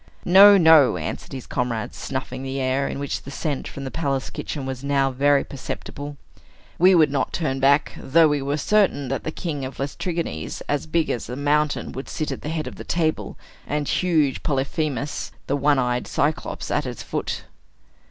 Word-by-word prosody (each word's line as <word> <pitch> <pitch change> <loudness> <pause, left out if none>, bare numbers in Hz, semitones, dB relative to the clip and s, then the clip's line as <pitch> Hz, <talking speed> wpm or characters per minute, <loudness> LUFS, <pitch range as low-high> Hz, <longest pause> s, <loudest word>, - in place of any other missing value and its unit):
"No, 200 +3 +9
no," 160 - +6
answered 80 - -5
his 130 -2 -6
comrades, 120 -3 -2
snuffing - - -5
the 135 0 -4
air, 130 +1 0
in - - -4
which 140 0 -3
the - - -10
scent 140 0 -3
from 140 - -7
the 135 - -5
palace 140 -5 -2
kitchen 145 -3 -5
was 130 0 -5
now 140 -1 +1
very 140 +2 +3
perceptible. 145 +1 -7 0.6
"We 185 +2 +6
would 155 -4 +5
not 135 -3 0
turn 135 -5 -1
back, 140 +2 +3
though 160 +4 +5
we 145 -1 0
were 140 +2 -1
certain 190 - +2
that 135 -1 -3
the 160 - -2
king 155 -5 -4
of 130 +1 -6
the - - -1
Laestrygons, 145 - -4
as 145 +1 -1
big 160 0 +1
as 120 - -4
a 125 - -4
mountain, 145 +2 0
would 135 - -7
sit 155 - -3
at - - -5
the 150 - -5
head 160 -1 -2
of - - -8
the - - -7
table, 160 -2 -1 0.3
and 145 0 -1
huge 155 -7 +1
Polyphemus, 140 0 -2
the 140 - 0
one 145 0 +3
eyed 125 -1 0
Cyclops, 150 +2 -2
at 145 -2 0
its 125 -2 -6
foot." - - -3
140 Hz, 190 wpm, -23 LUFS, 135-155 Hz, 0.6 s, No